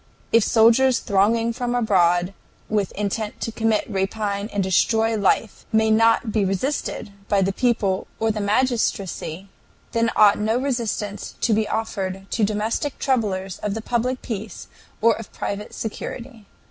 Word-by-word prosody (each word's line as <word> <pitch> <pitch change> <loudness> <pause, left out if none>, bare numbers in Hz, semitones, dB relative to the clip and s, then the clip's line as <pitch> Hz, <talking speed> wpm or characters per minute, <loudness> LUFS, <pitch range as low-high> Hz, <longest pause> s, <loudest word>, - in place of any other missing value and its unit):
If 230 -1 +6
soldiers 235 +4 +4
thronging 225 +4 +1
from 245 +1 -2
abroad 180 -5 +2 0.4
with 205 -3 0
intent 210 +1 -3
to 225 - -2
commit 225 -1 +1
rapine 200 +1 -2
and 200 -1 0
destroy 220 +4 +2
life 210 +1 0
may 220 0 +3
not 225 +1 +3
be 210 -2 +1
resisted 200 +3 -2 0.2
by 200 -1 +3
the 195 +1 0
people 215 -6 0
or 225 0 +2
the 215 -1 -3
magistracy, 200 -5 -1 0.4
then 230 -1 +1
ought 210 -1 +6
no 220 +2 +1
resistance 230 -6 -3
to 230 - +2
be 215 0 +1
offered 195 -4 -3
to 225 - 0
domestic 215 +7 -1
troublers 195 -8 -1
of 210 -1 -3
the 225 - -3
public 245 +2 -1
peace 220 -2 -6 0.3
or 230 +1 +5
of 225 - -9
private 205 +1 -4
security. 230 0 -6
220 Hz, 145 wpm, -22 LUFS, 200-230 Hz, 0.4 s, If